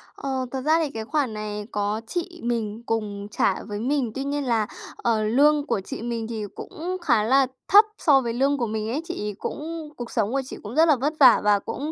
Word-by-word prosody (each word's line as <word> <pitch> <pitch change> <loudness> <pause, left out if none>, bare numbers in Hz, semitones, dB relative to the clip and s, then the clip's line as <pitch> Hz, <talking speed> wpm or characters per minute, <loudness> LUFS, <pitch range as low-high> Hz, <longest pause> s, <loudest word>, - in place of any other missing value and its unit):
Ờ, 265 -2 -3
thật 265 - -3
ra 310 +4 +3
thì 315 -3 0
cái 220 -3 -5
khoản 280 -3 0
này 210 -1 -5
có 205 +1 -1
chị 350 +2 -4
mình 230 -2 -2
cùng 205 -3 -3
trả - - +1
với 205 -1 -5
mình. 255 0 0
Tuy 270 - -2
nhiên 285 +1 -2
là, 230 -5 +1 0.3
ờ, 225 -2 +1
lương 285 +7 +4
của 210 - -1
chị 190 - -7
mình 230 -1 -3
thì 220 -2 -4
cũng 360 +3 -5
khá 240 -10 +3
là 265 +4 +4 0.2
thấp 415 +2 +8
so 275 -4 +4
với 235 -2 -2
lương 275 +4 +2
của 240 -3 -1
mình 215 0 -3
ấy, 275 +7 -1
chị 340 -8 -5
ấy 205 - -6
cũng 320 0 -5
cuộc 240 -1 -6
sống 220 -2 0
của 275 +1 +1
chị - - -8
cũng 215 +4 -7
rất 320 +2 +5
là 305 - +6
vất 280 +5 -1
vả 255 -4 +8
và 205 -1 +4
cũng 290 +9 -5
245 Hz, 235 wpm, -24 LUFS, 220-290 Hz, 0.3 s, thấp